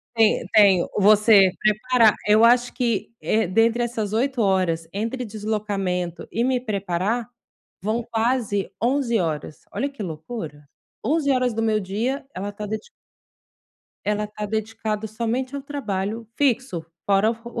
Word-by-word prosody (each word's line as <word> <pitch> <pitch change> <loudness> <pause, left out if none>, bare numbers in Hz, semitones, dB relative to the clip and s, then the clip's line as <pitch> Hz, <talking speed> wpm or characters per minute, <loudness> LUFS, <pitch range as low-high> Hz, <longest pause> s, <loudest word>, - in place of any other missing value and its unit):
Tem 225 -2 +3
tenho 200 -5 +5
você 205 -1 +6
preparar 220 +1 +4
Eu 215 +2 +5
acho 245 +1 +4
que, 230 -4 -1
eh, 220 -1 +1
dentre 225 +6 +2
essas 225 -4 -2
8 255 +3 0
horas, 185 -5 +1
entre 230 +5 -3
deslocamento 205 -5 -3
e 230 - -1
me 255 -1 +1
preparar, 205 +1 -2 0.5
vão 220 +5 -1
quase 225 -3 0
11 245 -1 +1
horas. 155 -2 -3
Olha 280 - -1
que 275 -5 -8
loucura. 160 -3 -7 0.4
11 300 -1 +1
horas 255 -3 +2
do 225 - -1
meu 220 -1 +2
dia, 225 +9 -2
ela 200 +2 -4
tá 210 +1 -6
dedi 215 - -5 1.2
ela 210 0 0
tá 210 0 -6
dedicada 220 0 -3
somente 235 +5 -3
ao 280 - -5
trabalho 225 -6 -3
fixo, 255 - 0 0.2
fora 200 +2 +3
o 230 - -5 0.2
o - - +1
220 Hz, 145 wpm, -23 LUFS, 200-240 Hz, 1.2 s, você